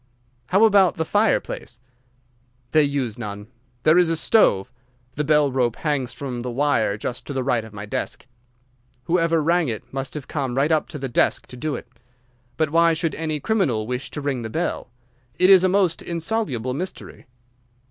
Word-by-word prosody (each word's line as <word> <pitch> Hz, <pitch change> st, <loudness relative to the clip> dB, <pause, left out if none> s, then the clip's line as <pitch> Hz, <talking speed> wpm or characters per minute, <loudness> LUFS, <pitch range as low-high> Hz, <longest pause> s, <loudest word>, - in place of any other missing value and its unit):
"How 195 Hz, +5 st, +5 dB
about 200 Hz, -4 st, +4 dB
the 160 Hz, -, -1 dB
fireplace?" 205 Hz, -, 0 dB, 0.9 s
"They 155 Hz, -, +5 dB
use 140 Hz, -6 st, -1 dB
none. 105 Hz, -1 st, -7 dB, 0.3 s
There 155 Hz, +3 st, +5 dB
is 175 Hz, -2 st, +3 dB
a 165 Hz, -, 0 dB
stove. 125 Hz, -, +3 dB, 0.4 s
The 150 Hz, -, -2 dB
bell 150 Hz, -1 st, +3 dB
rope 125 Hz, -3 st, +1 dB
hangs 140 Hz, -6 st, -1 dB
from 125 Hz, -4 st, -5 dB
the 125 Hz, -, -4 dB
wire 120 Hz, -5 st, +1 dB
just 120 Hz, +3 st, -5 dB
to 145 Hz, -, -4 dB
the 130 Hz, -1 st, -1 dB
right 125 Hz, -3 st, +1 dB
of 110 Hz, -, -11 dB
my 105 Hz, 0 st, -7 dB
desk. 105 Hz, -, -4 dB, 0.8 s
Whoever 165 Hz, +1 st, +1 dB
rang 170 Hz, 0 st, +2 dB
it 110 Hz, -3 st, -4 dB
must 135 Hz, +1 st, -4 dB
have 145 Hz, -3 st, -6 dB
come 135 Hz, -5 st, -3 dB
right 140 Hz, +4 st, +2 dB
up 155 Hz, -1 st, +1 dB
to -, -, -6 dB
the 135 Hz, -1 st, -4 dB
desk 120 Hz, -, +1 dB
to -, -, -9 dB
do 150 Hz, +3 st, -3 dB
it. 120 Hz, -, -8 dB, 0.7 s
But 155 Hz, -2 st, 0 dB
why 165 Hz, 0 st, +4 dB
should 165 Hz, 0 st, -1 dB
any 155 Hz, -2 st, -3 dB
criminal 140 Hz, -, 0 dB
wish 125 Hz, +3 st, -4 dB
to 150 Hz, -, -5 dB
ring 140 Hz, -3 st, -2 dB
the 110 Hz, -, -5 dB
bell? 165 Hz, -1 st, -3 dB, 0.5 s
It 185 Hz, +1 st, +5 dB
is 190 Hz, -2 st, +8 dB
a 185 Hz, -, +4 dB
most 185 Hz, -3 st, +2 dB
insoluble 165 Hz, -, -2 dB
mystery." 180 Hz, 0 st, -7 dB
145 Hz, 185 wpm, -22 LUFS, 125-165 Hz, 0.9 s, is